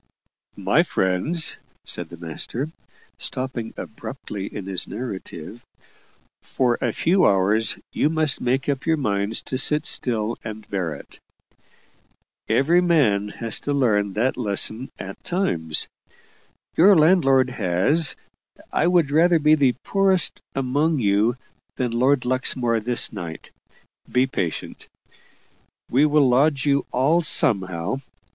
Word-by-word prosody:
"My - - +2
friends," 95 - +1 0.3
said - - 0
the 85 - -10
master, 100 - -5 0.5
stopping 130 -3 -4
abruptly 105 -4 -7
in 100 - -7
his 95 -2 -2
narrative, 105 -2 -7 0.8
"for 125 -2 0
a 120 - 0
few 180 - +2
hours 100 +3 +2 0.2
you 150 - +1
must 155 -3 +1
make 130 +2 0
up 140 0 -2
your 160 -1 +2
minds 100 -4 -1
to 130 - -3
sit 150 +3 +2
still 115 -6 +1
and 110 -1 -8
bear 90 -6 -2
it. - - -14 1.3
Every 145 +10 +3
man 125 - +2
has 115 +1 -3
to 145 - -3
learn 105 -7 +1
that 120 +6 0
lesson 110 +2 +1
at 95 +1 -9
times. 85 - -1 0.9
Your 195 +4 +6
landlord 135 -6 +4
has 130 - +2 0.6
I 165 - +2
would 175 -5 +2
rather 170 +3 +4
be 150 0 +3
the 135 -5 +3
poorest 195 -3 +1
among 145 +4 0
you 110 +1 +1 0.4
than 125 -2 -2
Lord 125 +3 +2
Luxmore 125 -2 0
this 120 +2 0
night. 80 -2 -8 0.6
Be 125 +1 +3
patient; 90 - -5 1.0
we'll 145 +2 +4
lodge 135 +3 +2
you 140 -1 +1
all 145 +7 +2
somehow. 95 - 0
125 Hz, 125 wpm, -22 LUFS, 105-150 Hz, 1.3 s, Your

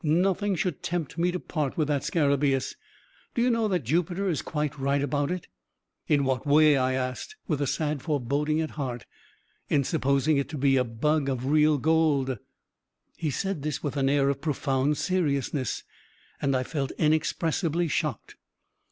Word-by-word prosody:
Nothing 190 +5 +2
should 180 -5 -2
tempt 170 -2 -3
me 175 +1 +2
to 180 - -3
part 150 -6 -3
with 155 -3 +1
that 145 -2 0
scarabaeus. 140 -4 +1 0.6
Do 235 - +1
you 250 - +3
know 230 -2 +1
that 180 -7 0
Jupiter 175 - 0
is 160 - 0
quite 150 -2 -3
right 140 +1 +1
about 145 +1 0
it?" 180 -1 -4 0.6
"In 145 -2 +3
what 130 +1 -1
way?" 150 +1 +6
I 130 -1 +1
asked, 130 - -3
with 150 -5 -1
a 140 - +1
sad 150 0 -1
foreboding 150 +1 0
at 160 - -3
heart. 125 -5 -4 0.6
"In 140 -2 +3
supposing 140 +3 +1
it 140 0 -1
to 150 - -5
be 135 0 +3
a 130 - +3
bug 140 +5 0
of 130 -1 -2
real 150 +1 +4
gold." 140 -4 +2 0.8
He 155 - -2
said 190 +3 -2
this 150 +1 -3
with 145 -2 -2
an 135 -1 +2
air 140 -1 +3
of 140 0 -2
profound 140 -1 0
seriousness, 140 - -1 0.6
and 135 -1 +1
I 130 - +1
felt 140 -2 -3
inexpressibly 160 +2 +1
shocked. 150 -6 -3
150 Hz, 170 wpm, -27 LUFS, 135-160 Hz, 0.8 s, way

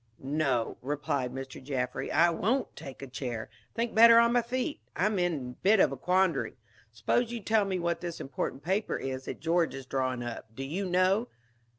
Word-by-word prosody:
"No," 135 -4 0
replied 140 -2 -2
Mr. 135 0 -7
Jaffry, 130 -1 -2
"I 170 0 +5
won't 225 +11 0
take 135 -3 -9
a - - -6
chair. 120 -4 -5 0.2
Think 235 0 -1
better 230 +1 +8
on 235 0 +5
my 245 - +4
feet. 255 +5 -3 0.2
I'm 205 +1 +1
in 175 -1 +2 0.2
a 125 - -17
bit 205 +2 +5
of - - +5
a - - -3
quandary. 180 0 +1 0.3
Suppose 125 - 0
you 240 - -3
tell 215 0 +2
me 190 -1 -1
what 170 -1 -1
this 175 -2 -5
important 135 0 -4
paper 190 +6 0
is 130 0 -4
that - - -6
George 165 -1 +1
is 135 -1 -7
drawing 130 -2 -1
up. 115 -2 -7
Do 135 - -5
you 180 +8 -3
know?" 185 +6 +3
165 Hz, 195 wpm, -29 LUFS, 130-200 Hz, 0.3 s, better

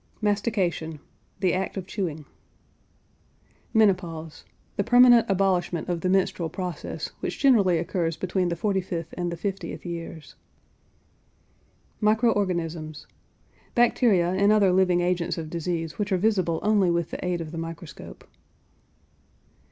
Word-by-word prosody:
MASTICATION. 200 -7 -1 0.4
The 185 -2 +2
act 190 +2 -2
of 190 - -4
chewing. 165 -7 -4 1.5
MENOPAUSE. 175 -8 0 0.3
The 200 - 0
permanent 240 0 +6
abolishment 180 -3 0
of 175 -2 -1
the 185 - 0
menstrual 185 -3 +1
process, 180 -1 -5
which - - -4
generally 205 -11 +4
occurs 165 -1 -1
between 185 0 -1
the 170 - -1
45th 180 -3 -2
and 175 -1 -3
the 170 - -5
50th 195 +2 -5
years. 165 -2 -7 1.7
MICRO 220 +2 +3
ORGANISMS. 165 -6 -2 0.7
Bacteria 225 -7 +3
and 200 +2 +3
other 205 -3 +4
living 180 -1 +3
agents 175 -1 0
of 160 -1 -6
disease 165 -1 -3
which 205 0 -2
are 190 - +3
visible 185 -5 +1
only 205 -3 +3
with 170 -1 0
the - - -5
aid 180 -1 -1
of 160 -2 -6
the 165 - -5
microscope. 165 0 -9
180 Hz, 130 wpm, -25 LUFS, 165-200 Hz, 1.7 s, permanent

